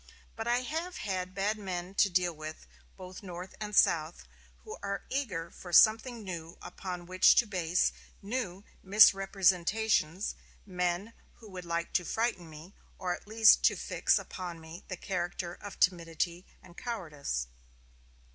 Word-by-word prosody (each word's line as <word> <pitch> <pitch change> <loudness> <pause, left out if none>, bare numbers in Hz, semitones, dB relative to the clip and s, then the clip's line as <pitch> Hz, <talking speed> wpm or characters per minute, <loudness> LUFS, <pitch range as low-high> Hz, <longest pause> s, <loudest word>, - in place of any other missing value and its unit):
But 225 +1 -5
I 240 +1 +2
have 325 +7 -4 0.4
bad 205 +2 0
men 185 -2 -5
to 200 0 +4
deal 180 -1 +1
with, 155 +1 -8 0.3
both 185 0 -9
North 180 -1 -8
and 210 -1 -4
South; 160 -2 +3
men - - -26
who 435 - -8
are 200 0 -3
eager 185 -12 -2
for 175 - -11
something 225 +5 +5
new 170 -3 -7
upon 180 -2 -7
which 185 +1 +5
to 240 - +5
base 180 -4 +1 0.3
new 200 -3 -4 0.2
misrepresentations; 195 -2 +3 0.3
men 180 +2 -2 0.2
who 220 -3 -14
would 180 -1 -8
like 170 0 -3
to 180 - +2
frighten 195 -4 -2
me, 155 +5 -12 0.2
or 180 -2 -1
at 175 - -10
least 220 0 +6
to - - +5
fix - - +1
upon 175 -3 -6
me 160 +3 -11
the 185 - -5
character 175 -1 -3
of 205 +2 -10
timidity 170 0 0 0.2
and 175 - -16
cowardice." 150 - -4
185 Hz, 145 wpm, -31 LUFS, 175-210 Hz, 0.4 s, least